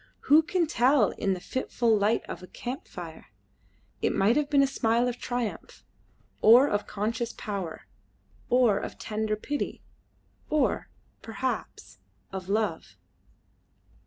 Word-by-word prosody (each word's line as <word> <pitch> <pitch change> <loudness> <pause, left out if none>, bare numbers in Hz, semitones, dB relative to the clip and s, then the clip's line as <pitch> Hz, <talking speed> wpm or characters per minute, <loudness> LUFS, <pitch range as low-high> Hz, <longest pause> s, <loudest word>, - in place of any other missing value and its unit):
Who 300 +3 +6
can 345 +2 0
tell 255 -5 +3
in 195 -2 -1
the - - -7
fitful 235 +1 0
light 210 +2 +2
of - - -6
a 185 - -10
camp 250 +7 -6
fire? 165 -3 -9 0.7
It - - +1
might 210 +5 +3
have 295 -1 +1
been 280 -2 +5
a - - +5
smile 235 -2 +1
of 245 0 -3
triumph, 245 -3 -4 0.6
or 240 +6 +8
of 205 -4 -1
conscious 225 +3 -2
power, 195 -6 -5 0.6
or 240 -5 +4
of - - -7
tender 215 0 -2
pity, 285 +7 -4 0.7
or, 300 -3 +1 0.3
perhaps, 250 +3 -5 0.3
of 190 -1 -6
love. 215 +1 -1
230 Hz, 130 wpm, -27 LUFS, 205-260 Hz, 0.7 s, or